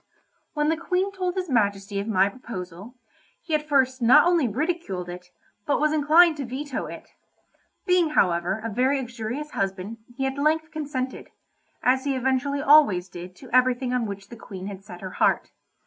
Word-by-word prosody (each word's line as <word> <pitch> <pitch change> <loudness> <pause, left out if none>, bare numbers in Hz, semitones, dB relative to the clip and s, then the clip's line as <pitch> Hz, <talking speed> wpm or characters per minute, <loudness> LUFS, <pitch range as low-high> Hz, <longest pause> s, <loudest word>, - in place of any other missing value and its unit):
When 295 0 +1
the 320 - +1
Queen 365 +4 -1
told 370 -2 -3
his 370 -1 -2
Majesty 200 -6 0
of 200 - -4
my 195 -3 +3
proposal, 200 -1 -8 0.5
he 320 - -5
at 300 0 0
first 260 -2 +2
not 260 +7 +7
only 345 -6 +3
ridiculed 240 - -2
it, 180 0 -8 0.4
but 290 - +2
was 305 +1 +2
inclined 310 +2 +5
to 285 - -3
veto 265 +3 -4
it. - - -10 0.8
Being, 360 -3 +3
however, 180 - +1
a - - -1
very 260 +6 +1
uxorious 245 +4 -5
husband, 195 +3 -3 0.2
he 270 - -1
at 270 +1 -3
length 315 +2 +1
consented—as 265 -2 -4
he 280 -1 -1
eventually 265 +2 0
always 275 -12 +5
did 180 0 -9
to 255 +5 -14
everything 255 0 +2
on 245 -3 0
which 200 0 -8
the 235 - -9
Queen 190 -4 -9
had 195 -1 -7
set 180 -3 -11
her 190 -1 -6
heart. - - +1
255 Hz, 175 wpm, -25 LUFS, 200-300 Hz, 0.8 s, not